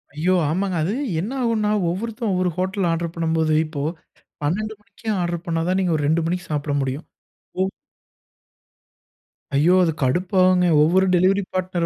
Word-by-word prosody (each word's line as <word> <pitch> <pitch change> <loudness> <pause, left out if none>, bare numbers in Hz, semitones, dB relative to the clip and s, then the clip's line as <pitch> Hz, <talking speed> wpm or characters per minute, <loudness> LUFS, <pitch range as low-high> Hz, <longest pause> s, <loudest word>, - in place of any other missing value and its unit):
ஐயோ! 170 +5 +1 0.2
ஆமாங்க. 185 +3 -1
அது 185 +6 -1 0.3
என்ன 215 +7 -4
ஆகுன்னா, 220 -3 +1 0.2
ஒவ்வொருத்தன் 225 +5 -3
ஒவ்வொரு 180 0 +1
ஹோட்டல்ல 190 -1 0
ஆர்டர் 165 0 -2
பண்ணும்போது, 160 -1 +1
இப்போ 155 -2 -5 0.6
12:00 215 +9 -1
மணிக்கே 220 +2 -9
ஆர்டர் 175 -1 -2
பண்னா 165 -1 0
தான் 185 +1 +2
நீங்க 180 -3 +1
ஒரு 145 - -1
2:00 160 +2 +2
மணிக்கு 180 +2 -2
சாப்பிட 145 -1 -1
முடியும். 135 +4 -3 0.6
ஒவ் 190 +1 +1 1.8
ஐயோ! 160 +6 +4
அது 165 - +2
கடுப்பாகுங்க. 180 +6 +3 0.2
ஒவ்வொரு 185 +5 +3
டெலிவரி 190 +3 +3
பார்ட்னர் 185 -2 -1
180 Hz, 145 wpm, -22 LUFS, 165-190 Hz, 1.8 s, ஐயோ